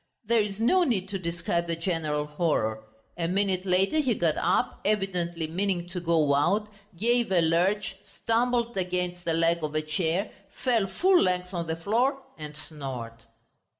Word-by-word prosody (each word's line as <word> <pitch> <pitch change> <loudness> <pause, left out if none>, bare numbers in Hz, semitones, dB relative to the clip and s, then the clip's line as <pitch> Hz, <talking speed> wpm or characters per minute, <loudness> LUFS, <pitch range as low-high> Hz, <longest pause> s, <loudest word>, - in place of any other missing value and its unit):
There 230 +1 +3
is 205 -1 -4
no 360 +11 +4
need 200 - 0
to 195 -1 -3
describe 170 0 -2
the 165 - -1
general 165 -4 -1
horror. 150 -8 -1 0.4
A 165 - 0
minute 190 0 0
later 190 +11 +2
he 260 -7 +2
got 165 -4 +1
up, 180 +3 0
evidently 180 -5 -1
meaning 175 +1 -1
to 180 - -4
go 165 -4 +2
out, 190 +9 +2 0.3
gave 235 +2 +2
a 185 - +4
lurch, 180 +5 +1
stumbled 235 0 0
against 180 -1 -2
the 165 - +1
leg 165 0 +2
of 155 0 -3
a 155 - +2
chair, 165 +5 -1 0.3
fell 230 -6 +2
full 360 - +3
length 180 0 0
on 170 -2 -3
the 160 - -1
floor 235 - +1 0.2
and 150 -1 -8
snored.... 135 -7 -6
180 Hz, 165 wpm, -27 LUFS, 165-205 Hz, 0.4 s, no